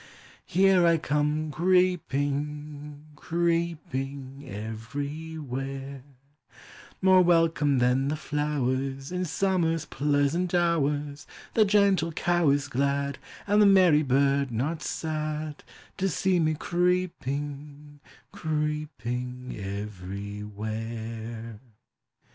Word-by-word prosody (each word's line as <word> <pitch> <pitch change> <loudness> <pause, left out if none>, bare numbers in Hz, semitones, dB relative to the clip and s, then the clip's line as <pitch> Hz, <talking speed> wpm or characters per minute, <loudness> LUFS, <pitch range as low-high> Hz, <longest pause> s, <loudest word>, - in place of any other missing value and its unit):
Here 190 0 +4
I 165 0 +5
come 150 +1 0
creeping, 150 -4 0
creeping 150 -5 -2
everywhere; 135 +4 -5 1.0
More 190 -1 +7
welcome 165 -5 +3
than 125 +2 +2
the 150 - 0
flowers 135 -2 -2
In 180 0 -1
summer's 170 -2 0
pleasant 145 +6 +1
hours; 150 -4 0 0.3
The 220 - +5
gentle 200 -4 +3
cow 175 -1 +2
is 140 +1 +2
glad, 140 +1 -1 0.3
And 205 +1 +4
the 205 - +7
merry 185 -6 +6
bird 140 0 +2
not 145 +8 -2
sad, 155 -1 -3 0.3
To 195 +1 +1
see 185 +1 +1
me 155 -1 +2
creeping, 145 -4 -2 0.3
creeping 130 -5 -3
everywhere. 105 +3 -6
145 Hz, 85 wpm, -27 LUFS, 135-165 Hz, 1.0 s, More